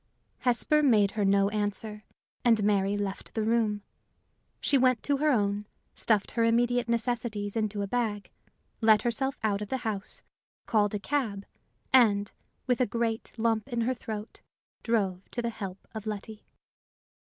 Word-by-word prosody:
Hesper 255 Hz, +5 st, +3 dB
made 215 Hz, -8 st, +4 dB
her 210 Hz, -, -1 dB
no 200 Hz, 0 st, +3 dB
answer, 210 Hz, +1 st, -3 dB, 0.4 s
and 225 Hz, -3 st, +4 dB
Mary 200 Hz, -1 st, +2 dB
left 200 Hz, -1 st, -4 dB
the 220 Hz, -, 0 dB
room. 215 Hz, -2 st, +1 dB, 0.8 s
She 285 Hz, -, +2 dB
went 255 Hz, -3 st, +3 dB
to 285 Hz, -1 st, +1 dB
her 305 Hz, +2 st, +2 dB
own, 205 Hz, -5 st, +1 dB, 0.3 s
stuffed 215 Hz, -3 st, +1 dB
her 230 Hz, -, +1 dB
immediate 240 Hz, +1 st, +2 dB
necessities 230 Hz, -3 st, -1 dB
into 215 Hz, -2 st, -1 dB
a -, -, -3 dB
bag, 215 Hz, -2 st, -2 dB, 0.5 s
let 220 Hz, -1 st, +5 dB
herself 265 Hz, +3 st, -1 dB
out 205 Hz, -2 st, +1 dB
of 210 Hz, -, -5 dB
the 265 Hz, -, 0 dB
house, 205 Hz, -3 st, -3 dB, 0.4 s
called 210 Hz, -2 st, +2 dB
a -, -, -1 dB
cab, 210 Hz, -4 st, -2 dB, 0.5 s
and, 205 Hz, -6 st, +5 dB, 0.3 s
with 250 Hz, 0 st, +1 dB
a 250 Hz, -, +3 dB
great 230 Hz, +1 st, -2 dB
lump 225 Hz, -1 st, +1 dB
in 240 Hz, -2 st, -1 dB
her 245 Hz, +3 st, +1 dB
throat, 220 Hz, -2 st, -7 dB, 0.4 s
drove 195 Hz, -5 st, -1 dB
to -, -, -2 dB
the 235 Hz, -, -1 dB
help 195 Hz, -4 st, -6 dB, 0.2 s
of 220 Hz, -1 st, -6 dB
Letty. 215 Hz, 0 st, -6 dB
220 Hz, 155 wpm, -28 LUFS, 205-235 Hz, 0.8 s, let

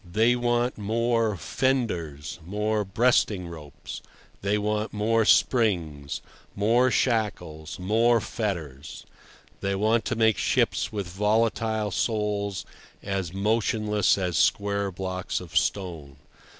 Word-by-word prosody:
They 110 Hz, +7 st, +2 dB
want 120 Hz, 0 st, 0 dB
more 115 Hz, 0 st, +1 dB
fenders, 85 Hz, -, -2 dB
more 105 Hz, +4 st, -1 dB
breasting 100 Hz, -2 st, +2 dB
ropes; 75 Hz, -4 st, -9 dB, 0.4 s
they 100 Hz, +1 st, +1 dB
want 105 Hz, +1 st, -1 dB
more 110 Hz, +1 st, +2 dB
springs, 85 Hz, -, +2 dB, 0.3 s
more 115 Hz, +5 st, +3 dB
shackles, 100 Hz, -12 st, -1 dB
more 115 Hz, +5 st, +3 dB
fetters; 80 Hz, -, -5 dB, 0.5 s
they 100 Hz, 0 st, -1 dB
want 110 Hz, +3 st, +2 dB
to -, -, -1 dB
make 110 Hz, -1 st, +3 dB
ships -, -, +1 dB
with 105 Hz, -3 st, -3 dB
volatile 110 Hz, +2 st, 0 dB
souls 105 Hz, -1 st, -1 dB, 0.4 s
as 95 Hz, -4 st, -2 dB
motionless 105 Hz, 0 st, +1 dB
as 90 Hz, -3 st, 0 dB
square 100 Hz, -1 st, +1 dB
blocks 95 Hz, 0 st, -3 dB
of 90 Hz, -2 st, -11 dB
stone. 85 Hz, -8 st, -1 dB
105 Hz, 110 wpm, -26 LUFS, 90-110 Hz, 0.5 s, more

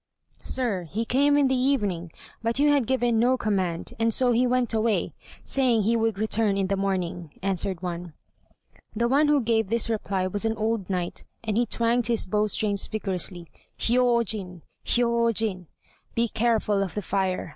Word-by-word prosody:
"Sir, 220 Hz, -9 st, -2 dB
he 215 Hz, +8 st, -3 dB
came 285 Hz, +4 st, +3 dB
in 285 Hz, -2 st, +4 dB
the 265 Hz, -, +1 dB
evening, 205 Hz, -, 0 dB, 0.3 s
but 230 Hz, +1 st, -1 dB
you 290 Hz, +1 st, +4 dB
had 280 Hz, -6 st, +2 dB
given 240 Hz, -3 st, +1 dB
no 250 Hz, +3 st, +3 dB
command, 190 Hz, -7 st, -2 dB
and 225 Hz, 0 st, +2 dB
so 250 Hz, +2 st, +3 dB
he 245 Hz, +2 st, +3 dB
went 245 Hz, -2 st, +1 dB
away, 220 Hz, -1 st, 0 dB, 0.3 s
saying 245 Hz, -5 st, +2 dB
he 230 Hz, +3 st, +2 dB
would 225 Hz, -2 st, 0 dB
return 215 Hz, -1 st, +1 dB
in 195 Hz, -, +1 dB
the 200 Hz, -, +1 dB
morning," 185 Hz, -3 st, -2 dB
answered 190 Hz, -1 st, -2 dB
one. 175 Hz, -2 st, -5 dB, 0.8 s
The 235 Hz, +2 st, +1 dB
one 285 Hz, +5 st, +3 dB
who 295 Hz, -1 st, +3 dB
gave 225 Hz, -2 st, +1 dB
this 230 Hz, +2 st, -1 dB
reply 200 Hz, -4 st, -1 dB
was 200 Hz, +3 st, -2 dB
an 225 Hz, 0 st, 0 dB
old 220 Hz, -3 st, -1 dB
knight, 180 Hz, -2 st, -3 dB, 0.2 s
and 215 Hz, -2 st, -2 dB
he 240 Hz, +1 st, +2 dB
twanged 235 Hz, 0 st, +1 dB
his 235 Hz, -2 st, 0 dB
bow 210 Hz, +3 st, +1 dB
strings 205 Hz, -1 st, 0 dB
vigorously, 185 Hz, -4 st, -3 dB, 0.3 s
"Hiyôjin! 230 Hz, -7 st, +1 dB, 0.2 s
hiyôjin!" 230 Hz, -6 st, +1 dB, 0.5 s
(Be 235 Hz, 0 st, +2 dB
careful 220 Hz, -3 st, +1 dB
of 190 Hz, -4 st, -3 dB
the 210 Hz, -, -3 dB
fire! 190 Hz, -2 st, -1 dB
220 Hz, 170 wpm, -25 LUFS, 195-235 Hz, 0.8 s, in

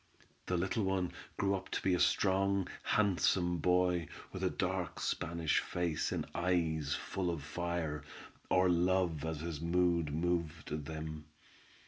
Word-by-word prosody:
The 90 Hz, -, +1 dB
little 95 Hz, +5 st, 0 dB
one 95 Hz, -2 st, 0 dB, 0.3 s
grew 100 Hz, -1 st, +1 dB
to -, -, -2 dB
be 95 Hz, -, +3 dB
a 90 Hz, -, +2 dB
strong, 100 Hz, -1 st, +3 dB
handsome 90 Hz, -3 st, +2 dB
boy, 90 Hz, 0 st, +2 dB, 0.3 s
with -, -, -4 dB
a -, -, +3 dB
dark -, -, -2 dB
Spanish 85 Hz, -2 st, 0 dB
face, 85 Hz, -3 st, -1 dB
and -, -, -1 dB
eyes 80 Hz, -5 st, +1 dB
full 95 Hz, -2 st, -2 dB
of 85 Hz, -5 st, -3 dB
fire, 80 Hz, -1 st, -2 dB, 0.5 s
or 90 Hz, 0 st, +4 dB
love 90 Hz, -3 st, +2 dB
as 80 Hz, -2 st, -3 dB
his 80 Hz, -3 st, -4 dB
mood 85 Hz, -2 st, +2 dB
moved 80 Hz, -2 st, -1 dB
them. 80 Hz, 0 st, -5 dB
85 Hz, 135 wpm, -34 LUFS, 80-90 Hz, 0.5 s, or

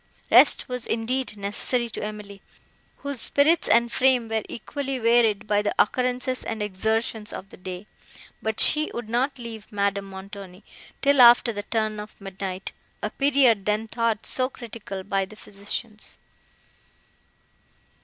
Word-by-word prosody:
Rest -, -, +6 dB
was, 250 Hz, -2 st, -4 dB
indeed, 230 Hz, 0 st, -2 dB
necessary 210 Hz, +4 st, -1 dB
to -, -, -6 dB
Emily, 210 Hz, -2 st, -7 dB, 0.6 s
whose 280 Hz, -4 st, -2 dB
spirits 305 Hz, +4 st, +3 dB
and 235 Hz, 0 st, +4 dB
frame 255 Hz, -3 st, +3 dB
were 220 Hz, 0 st, 0 dB
equally 270 Hz, +3 st, -4 dB
wearied 225 Hz, -2 st, +3 dB
by 210 Hz, -1 st, +2 dB
the 205 Hz, -, -2 dB
occurrences 250 Hz, +2 st, +1 dB
and 225 Hz, -2 st, -3 dB
exertions 220 Hz, +2 st, -2 dB
of 195 Hz, -, -8 dB
the -, -, -12 dB
day; 185 Hz, +1 st, -7 dB, 0.6 s
but 220 Hz, 0 st, -2 dB
she 305 Hz, 0 st, +4 dB
would 235 Hz, -2 st, -5 dB
not 255 Hz, +5 st, 0 dB
leave 230 Hz, -3 st, -9 dB
Madame 200 Hz, -1 st, 0 dB
Montoni, 195 Hz, 0 st, -10 dB, 0.4 s
till 280 Hz, -1 st, +5 dB
after 240 Hz, 0 st, +7 dB
the 205 Hz, -, -3 dB
turn 215 Hz, 0 st, -2 dB
of 210 Hz, +1 st, -10 dB
midnight, 195 Hz, -1 st, -6 dB, 0.3 s
a -, -, -2 dB
period 265 Hz, -7 st, +3 dB
then 210 Hz, +1 st, 0 dB
thought 230 Hz, -1 st, -1 dB
so 255 Hz, 0 st, +1 dB
critical 220 Hz, -6 st, -8 dB
by 195 Hz, 0 st, 0 dB
the 195 Hz, +3 st, -10 dB
physicians. 210 Hz, +2 st, -6 dB
220 Hz, 145 wpm, -25 LUFS, 205-245 Hz, 0.6 s, after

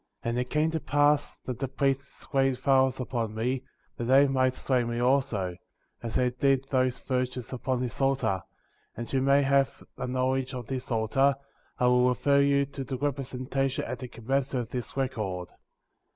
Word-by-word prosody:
12. -, -, -1 dB
And -, -, 0 dB
it 125 Hz, -, -5 dB
came 155 Hz, +1 st, +1 dB
to 160 Hz, -, -1 dB
pass 145 Hz, 0 st, +2 dB
that 125 Hz, -3 st, -4 dB
the 135 Hz, -, -1 dB
priests 135 Hz, +1 st, -2 dB
laid 135 Hz, -1 st, +3 dB
violence 130 Hz, 0 st, +3 dB
upon 115 Hz, -4 st, -2 dB
me, 125 Hz, +4 st, -1 dB, 0.4 s
that 120 Hz, -, -3 dB
they 135 Hz, +3 st, +6 dB
might 130 Hz, -1 st, +2 dB
slay 130 Hz, -2 st, +1 dB
me 120 Hz, 0 st, -3 dB
also,* 120 Hz, -8 st, +1 dB, 0.5 s
as 115 Hz, -2 st, -5 dB
they 125 Hz, -1 st, +2 dB
did 135 Hz, +1 st, +2 dB
those 130 Hz, -2 st, +2 dB
virgins 125 Hz, -1 st, -3 dB
upon 130 Hz, 0 st, -1 dB
this 125 Hz, +1 st, -4 dB
altar; 135 Hz, -9 st, +1 dB, 0.6 s
and 120 Hz, -, -3 dB
that -, -, -10 dB
you 135 Hz, -, +2 dB
may 140 Hz, +1 st, +4 dB
have 135 Hz, 0 st, +2 dB, 0.2 s
a -, -, -2 dB
knowledge 130 Hz, +1 st, 0 dB
of 125 Hz, -2 st, -5 dB
this 130 Hz, +2 st, -4 dB
altar, 130 Hz, +4 st, +2 dB, 0.4 s
I 125 Hz, -, +1 dB
will 125 Hz, 0 st, +5 dB
refer 140 Hz, +3 st, +3 dB
you 140 Hz, 0 st, +3 dB
to 140 Hz, 0 st, -6 dB
the 130 Hz, 0 st, -4 dB
representation 135 Hz, -1 st, -2 dB
at -, -, -5 dB
the 130 Hz, -, -6 dB
commencement 130 Hz, +2 st, -1 dB
of 110 Hz, -, -12 dB
this 125 Hz, +1 st, -5 dB
record. 105 Hz, -10 st, -2 dB
130 Hz, 185 wpm, -28 LUFS, 125-135 Hz, 0.6 s, they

